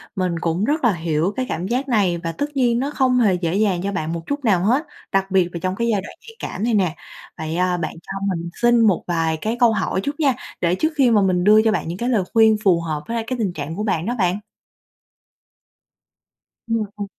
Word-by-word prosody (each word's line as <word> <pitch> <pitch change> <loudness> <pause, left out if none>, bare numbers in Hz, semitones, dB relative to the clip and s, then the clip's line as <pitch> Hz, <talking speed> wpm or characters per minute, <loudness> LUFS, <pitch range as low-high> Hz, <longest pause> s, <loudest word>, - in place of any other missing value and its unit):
mình 180 -3 -1
cũng 170 +4 -1
rất 300 +1 0
là 230 -5 +4
hiểu 165 +3 -1
cái 255 - 0
cảm 175 +4 -3
giác 255 +4 -1
này 195 -7 +2
và 165 - -2
tất 285 +11 -2
nhiên 240 -2 +2
nó 280 +3 -2
không 255 -3 +2
hề 205 -5 +4
dễ 175 0 -1
dàng 200 -4 +1
cho 200 - -1
bạn 160 -3 -3
một 165 - -4
chút 285 -2 -3
nào 185 -5 +3
hết, 255 +9 +2 0.3
đặc 195 0 0
biệt 185 -2 +3
là 170 - -4
trong 185 0 -1
cái 235 +3 -1
giai 200 -3 +1
đoạn - - -10
nhạy 455 -1 -14
cảm 205 - -5
này 235 -1 +1
nè. 180 -5 +1 0.4
Vậy, 160 +1 -4
à, 180 -1 +1
bạn 160 - -3
cho 195 - -6 0.2
mình 170 +1 -5
xin 240 0 +4
một 210 -6 +3
vài 165 -2 0
cái 225 +2 -1
câu 235 -2 +5
hỏi 190 - -1
chút 285 +2 -4
nha, 275 -4 +3 0.3
để 175 +1 +2
trước 315 - 0
khi 260 -5 +4
mà 210 -2 +4
mình 180 -2 +2
đưa 215 +2 +6
cho 220 0 +2
bạn 210 - -2
những 170 +2 -4
cái 240 +3 -2
lời 215 -7 +2
khuyên 220 -1 +5
phù 175 -4 +4
hợp 155 -2 -3
với 230 - -3
lại 225 - -1
cái 255 - -2
tình 200 -6 -1
trạng 155 0 -5
của 210 - -3
bạn 175 -5 -1
đó 240 +2 -1
bạn. 185 +1 +1 2.3
Ừm, 230 -1 0
ờ. 205 - -3
200 Hz, 250 wpm, -21 LUFS, 175-235 Hz, 2.3 s, đưa